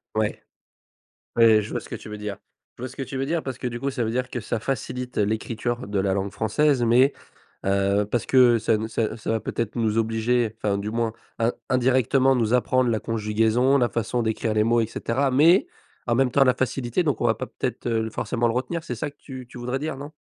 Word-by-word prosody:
Ouais. - - -1 0.9
Ouais, 115 -2 +6
je 105 - -8
vois - - -1
ce - - -13
que - - -4
tu - - -10
veux 105 - -6
dire. 105 -1 -5 0.4
Je 120 - -8
vois 130 - -4
ce - - -13
que - - -5
tu 135 0 -5
veux 135 - -1
dire 165 +3 -1
parce 130 -2 -5
que - - -7
du 120 0 -5
coup, 140 - -1
ça 130 -3 -2
veut 110 - -1
dire 125 +2 -2
que 125 - -4
ça 115 +1 -3
facilite 125 0 -4
l'écriture 115 +3 -1
de 100 -1 -1
la 95 0 +1
langue 100 0 -2
française 130 +5 +1
mais 125 +4 +4 0.5
heu, 100 +1 +2
parce 115 +2 -2
que 125 -3 +5
ça 110 0 +2
ne 110 +1 -3
ça 115 - -2
heu, 110 +1 -3
ça 110 - -3
va 115 - +1
peut-être 110 +1 -3
nous 110 -2 0
obliger- 115 0 +1
enfin 100 -2 0
du 100 +2 -4
moins 115 0 0 0.3
in 115 +1 +2 0.2
indirectement 130 +1 +3
nous 115 -2 +1
apprendre 125 0 +2
la 110 - 0
conjugaison, 115 +5 +2
la 120 -2 +2
façon 115 +1 -1
d'écrire 110 0 -1
les 105 0 +3
mots 115 +1 +3
et - - +1
cetera- 130 +4 -1
mais, 160 +8 +5 0.4
en 120 - +2
même 130 +1 +3
temps 140 - +5
la 130 -1 +4
facilité 130 +3 -1
donc 145 -8 0
on - - +1
va - - +4
pas - - -5
peut-être, - - -4
heu, 110 -1 0
forcément 120 +2 -1
le 115 - 0
retenir, 130 +7 -2
c'est 125 -7 -5
ça 145 +6 -3
que - - -36
tu 130 -3 -9
tu 125 - -11
voudrais 125 +2 -3
dire, 150 -1 -4
non? 145 +2 -8
120 Hz, 245 wpm, -24 LUFS, 110-130 Hz, 0.9 s, Ouais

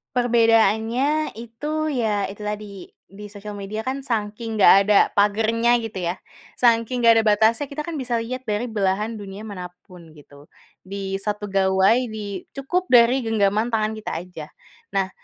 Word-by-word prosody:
Perbedaannya 235 +4 +2
itu 300 +7 -4
ya 220 -8 -1
itu 200 +2 -10
tadi, 210 -2 -6 0.2
di 205 +2 -11
sosial 205 0 -8
media 200 +2 -5
kan 260 +4 -3
sangking 225 -1 -3
enggak - - +8
ada 210 0 +3 0.2
pagernya 220 +3 +2
gitu 225 -3 -7
ya, 170 - 0 0.5
sangking 235 +1 +2
enggak 230 -1 +7
ada 225 - +2
batasnya, 220 +6 +2
kita 280 +2 -6
kan 320 +1 -5
bisa 245 -4 -2
lihat 255 +3 -6
dari 215 +2 -2
belahan 210 +1 -1
dunia 200 0 -9
manapun 180 -4 -11
gitu. 145 -1 -17 0.4
Di 195 0 -4
1 205 +1 -4
gawai, 190 +2 +3 0.2
di 205 -3 -6
cukup 355 +7 -2
dari 245 +1 +5
genggaman 220 +1 +1
tangan 220 0 0
kita 215 - -6
aja. 175 -4 -9 0.5
Nah, 195 -1 0
215 Hz, 155 wpm, -22 LUFS, 200-235 Hz, 0.5 s, enggak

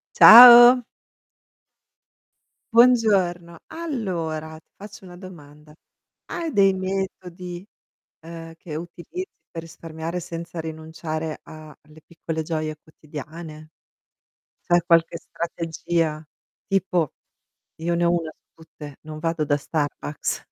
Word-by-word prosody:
Ciao. 240 +2 +10 1.9
Buongiorno. 195 -9 +3
Allora, 170 - -5
ti - - -39
faccio 200 -1 -13
una 175 - -12
domanda. 150 -5 -14 0.5
Hai 330 -2 -5
dei 195 -5 +3
metodi, 185 -1 -6 0.6
uhm, 165 0 -10
che 160 -2 -9
utilizzi 175 - -7 0.3
per 165 - -7
risparmiare, 165 +1 -7
senza 170 0 -8
rinunciare 160 0 -6
a 155 -1 -13
a - - -17
le 155 +1 -19
piccole 165 -1 -6
gioie 155 -1 -4
quotidiane? 155 +1 -11 1.0
C'è 175 -1 +3
qualche 170 -1 +2
strategia? 165 -2 -3 0.5
Tipo, 180 -6 -1 0.7
io 170 +1 -1
ne 175 0 0
ho 170 - +3
1 170 -2 -2
su - - -35
tutte: 150 -3 -12
non 155 0 -9
vado 165 0 -2
da 145 -1 0
Starbucks 145 0 -4
165 Hz, 110 wpm, -22 LUFS, 155-185 Hz, 1.9 s, Ciao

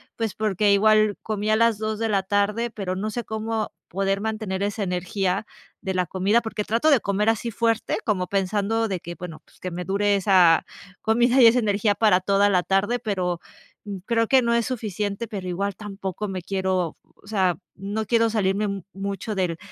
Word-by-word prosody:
pues 225 -3 -2
porque 210 -1 +1
igual 215 +1 +4
comí 215 -1 -2
a 215 - +4
las 230 -1 +3
14:00 210 0 0
pero 195 -5 -4
no 205 +3 -2
sé 240 +3 -4
cómo 220 0 -3 0.2
poder 195 +2 -1
mantener 215 -3 -3
esa 205 +1 -2
energía 180 +2 -1 0.4
de 190 -2 -3
la 180 -1 +1
comida, 195 +7 +2
porque 220 -2 -3
trato 230 +9 +2
de 280 -4 +5
comer 210 +1 0
así 225 +1 -1
fuerte, 230 0 0
como 195 -5 0
pensando 205 +4 0
de 190 -3 -3
que, 170 +1 -7
bueno, 170 -1 -8
pues - - -25
que 185 - -4
me 180 0 -5
dure 205 +2 +2
esa 185 -4 +5 0.4
comida 240 +3 +3
y - - +9
esa 235 +2 +5
energía 210 -1 +1
para 205 -4 +4
toda 200 +2 +3
la 180 -3 +2
tarde, 195 +6 +1
pero 180 -6 -2 0.7
creo 230 -1 +1
que 265 +2 +5
no 235 -1 +1
es 235 -1 +1
suficiente, 215 -3 -3
pero 195 -5 -6
igual 195 +2 -2
tampoco 200 0 -5
me 190 -2 -4
quiero, 185 -2 -1 0.2
o - - -20
sea, 190 -4 +1 0.2
no 205 +3 -3
quiero 230 +1 +3
salirme 205 -1 +1
mu 200 -2 -4
mucho 200 +2 -4
del 180 -4 -1
205 Hz, 185 wpm, -24 LUFS, 190-220 Hz, 0.7 s, y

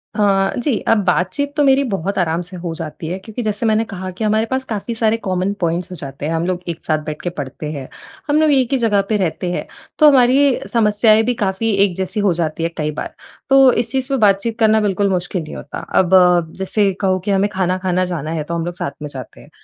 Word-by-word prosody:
हाँ, 195 -2 +2
जी, 245 -2 0
अब 225 - +4
बातचीत 185 +11 0
तो 295 - +4
मेरी 275 0 +4
बहुत 200 -5 -3
आराम 170 -1 0
से 180 +1 -9
हो 170 -1 -5
जाती 160 0 -6
है 180 +3 -3
क्योंकि 220 +5 -7
जैसे 215 +1 -2
मैंने 220 0 +2
कहा 190 -2 -6
कि 185 +5 -6
हमारे 215 +1 +2
पास 260 0 0
काफ़ी 225 0 -4
सारे 225 0 +1
कॉमन 185 -2 -1
पॉइंट्स 170 +2 -1
हो - - -5
जाते 140 -2 -7
हैं, 160 - -1
हम 165 +1 -1
लोग 185 -1 -1
एक 165 - -4
साथ 155 -1 +1
बैठ 155 -1 -5
के 175 - -2
पढ़ते 150 -1 -6
हैं। 140 -4 -6 0.4
हम 295 - +3
लोग 310 - +4
एक 265 -3 +2
ही 270 - +3
जगह 220 -5 +2
पे 215 - +2
रहते 180 -1 -2
हैं, - - -3 0.3
तो 305 - +7
हमारी 265 0 +4
समस्याएँ 215 0 +4
भी 245 - +1
काफ़ी 195 +3 0
एक 180 - -4
जैसी 190 +3 -3
हो 200 -3 +2
जाती 165 -1 -2
हैं 165 - -1
कई 150 -1 -1
बार, - - -6 0.4
तो 270 -1 +7
इस 235 -1 -1
चीज़ 265 -1 -1
पे 275 - +1
बातचीत 210 +1 +2
करना 220 -1 +4
बिल्कुल 200 0 +1
मुश्किल 180 -2 -2
नहीं 155 - -9
होता। 145 - -7 0.2
अब 190 0 +3 0.4
जैसे 195 +1 +1
कहो 190 -1 +1
कि 205 - 0
हमें 195 +1 +2
खाना-खाना 185 -1 0
जाना 160 -3 -4
है 160 -2 -2
तो 170 - -6
हम 165 - -2
लोग 175 - -4
साथ 140 - -3
में 150 - -4
जाते 130 -4 -9
हैं। - - -17
195 Hz, 240 wpm, -18 LUFS, 175-225 Hz, 0.4 s, तो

